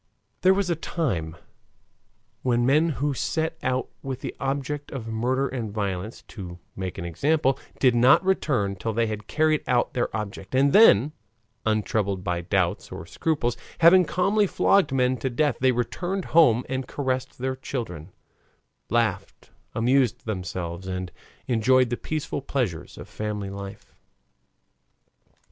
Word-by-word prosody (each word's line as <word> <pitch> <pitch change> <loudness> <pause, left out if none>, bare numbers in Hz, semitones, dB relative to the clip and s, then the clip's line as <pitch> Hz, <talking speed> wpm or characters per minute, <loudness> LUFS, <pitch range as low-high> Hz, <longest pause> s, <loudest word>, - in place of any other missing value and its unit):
There 190 +1 +5
was 195 -3 0
a - - +2
time 105 - -2 1.1
when 120 -1 +1
men 150 +6 +4
who 145 +3 0
set 160 +6 -1
out 130 0 -1
with 135 -2 -5
the - - -5
object 140 +1 -3
of 120 -5 -6
murder 125 +5 0
and 120 -5 -4
violence, 100 0 -4
to 90 -5 -8 0.2
make 95 -1 -5
an 85 - -5
example, 135 - +1 0.2
did 130 -2 +4
not 125 +9 +5
return 125 - +1
till 110 +4 -3
they 115 +2 +2
had 110 -1 -5
carried 155 -1 +2
out 125 -1 +1
their 120 - 0
object, 100 +1 -6
and 140 +1 +4
then, 150 - +7 0.6
untroubled 105 -3 0
by 85 -1 -1
doubts 90 +1 -1
or 80 - -7
scruples, 120 - -1 0.3
having 180 +3 +8
calmly 195 +6 +2
flogged 190 -4 +3
men 130 -1 +2
to 130 +3 -2
death, 140 +2 0
they 130 0 +4
returned 175 +10 -2
home 125 -8 +5
and 130 0 -3
caressed 130 -2 -2
their 130 +1 -2
children, 100 - -6 0.8
laughed, - - -1 0.2
amused 125 +1 +2
themselves, 90 -3 -4
and 90 -1 -4 0.3
enjoyed 125 +1 +3
the - - +1
peaceful 155 +1 -4
pleasures 125 - -3
of - - -9
family 105 -2 -4
life. 100 0 -9
125 Hz, 145 wpm, -25 LUFS, 105-140 Hz, 1.1 s, having